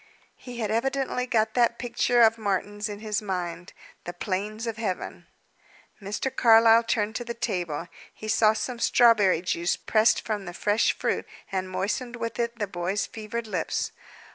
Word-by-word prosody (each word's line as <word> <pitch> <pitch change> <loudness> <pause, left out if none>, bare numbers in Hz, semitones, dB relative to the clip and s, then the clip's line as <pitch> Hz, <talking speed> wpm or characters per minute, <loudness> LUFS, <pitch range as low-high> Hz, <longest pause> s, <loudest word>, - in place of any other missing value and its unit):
He 245 -1 -10
had 215 -1 -1
evidently 255 +2 -1
got 220 -2 +1
that 235 -1 +2
picture 245 0 +2
of 225 0 +4
Martin's 205 +1 -2
in 205 0 -7
his 215 -1 -2
mind, 180 -3 -4 0.3
"The 175 - -5
Plains 205 +4 -3
of 225 -2 -4
Heaven." 210 -5 -4 0.7
Mr. 210 +7 -3
Carlyle 225 0 +6
turned 220 -2 -1
to 240 - -4
the 235 0 -6
table. 175 -8 -3 0.2
He 215 - -10
saw 215 0 +4
some 235 +2 -4
strawberry 210 -9 +4
juice, 175 -1 0
pressed 220 +1 +3
from 210 -3 -3
the 175 0 -7
fresh 210 +3 +2
fruit, - - -1 0.2
and 185 -1 -2
moistened 210 +7 -2
with 230 -1 -5
it 235 0 -1
the 210 - -1
boy's 185 +1 -2
fevered 225 +1 -6
lips. 185 -6 -2
215 Hz, 165 wpm, -26 LUFS, 195-235 Hz, 0.7 s, Carlyle